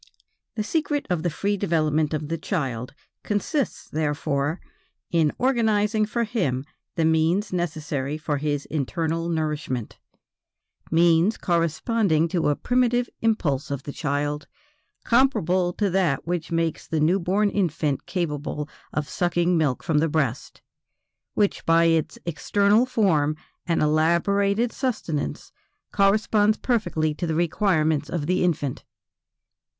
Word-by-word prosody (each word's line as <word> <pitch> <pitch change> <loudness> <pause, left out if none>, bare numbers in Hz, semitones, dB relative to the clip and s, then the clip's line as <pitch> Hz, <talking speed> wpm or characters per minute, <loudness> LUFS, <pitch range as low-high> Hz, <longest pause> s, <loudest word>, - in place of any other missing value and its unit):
The 215 - -1
secret 295 +3 -1
of 175 -3 +1
the 175 - 0
free 200 +6 -1
development 155 -5 +1
of 155 -1 -2
the 165 +2 -2
child 135 - -3 0.3
consists, 225 +7 -2
therefore, 145 0 -1 0.5
in 160 -3 +3
organizing 220 -4 +2
for 235 +2 -1
him 175 - -1 0.3
the 165 - +1
means 165 +6 +2
necessary 150 -5 -2
for 155 -2 -2
his 145 0 -2
internal 165 +3 -2
nourishment, 150 -7 -3 0.9
means 170 +5 +4
corresponding 170 +1 +1
to 170 -3 +1
a 145 - +2
primitive 245 - +1
impulse 160 -12 0
of 140 -2 -4
the 145 - -6
child, 145 +1 -2 0.6
comparable 185 -8 +2
to 205 - 0
that 175 -7 +1
which 170 -1 -3
makes 165 -1 -1
the 160 - -1
new 170 +6 +3
born 195 +4 +1
infant 160 -7 -1
capable 150 -4 -3 0.2
of 150 -1 -2
sucking 175 0 +1
milk 150 -6 0
from 160 -3 +2
the 165 +1 +1
breast, 140 -5 -2 0.7
which 205 -2 +1
by 165 0 +4
its 165 -2 +1
external 200 +7 +2
form 160 - +2 0.3
and 170 -2 +1
elaborated 200 +8 +2
sustenance, 210 - -3 0.4
corresponds 210 +1 +3
perfectly 185 -11 0
to 170 +3 -4
the 160 - -1
requirements 160 -3 +1
of 165 -4 -2
the 180 +3 +1
infant. 150 -7 -1
165 Hz, 125 wpm, -24 LUFS, 150-200 Hz, 0.9 s, means